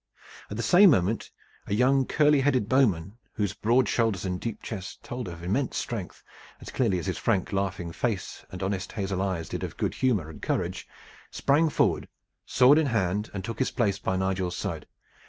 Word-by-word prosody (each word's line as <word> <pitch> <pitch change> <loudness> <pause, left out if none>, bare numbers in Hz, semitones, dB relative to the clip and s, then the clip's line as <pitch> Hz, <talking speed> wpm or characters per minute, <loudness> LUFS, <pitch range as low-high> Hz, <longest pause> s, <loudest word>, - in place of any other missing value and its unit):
At 105 - -5
the 115 - -2
same 185 - +7
moment 105 - +1 0.4
a 100 - 0
young 130 +3 +3
curly 150 -1 +4
headed 130 -6 +2
bowman, 110 -6 +1
whose 100 -3 -1
broad 120 +5 +2
shoulders 110 -6 0
and 90 -1 -3
deep 115 -2 -5
chest 95 -4 -7
told 120 -2 -5
of 85 -1 -8
immense 110 +10 -1
strength, 110 -7 -5 0.4
as - - -9
clearly 110 -8 +1
as 85 - -4
his - - -2
frank, 95 +1 0
laughing 95 -3 -2
face 105 +1 -3
and 95 +1 -6
honest 95 0 -3
hazel 95 -3 -2
eyes 95 -5 -2
did - - -5
of - - -6
good - - -1
humor 110 -11 +1
and 80 - -11
courage, - - -2 0.4
sprang 150 +4 +2
forward - - +1 0.4
sword 140 +5 +6
in 155 - +1
hand 105 -3 0
and 95 -2 -5
took 115 - -5
his 130 - +1
place 100 -5 0
by 95 -1 -1
Nigel's 95 -1 -1
side. - - -4
105 Hz, 190 wpm, -27 LUFS, 95-125 Hz, 0.4 s, same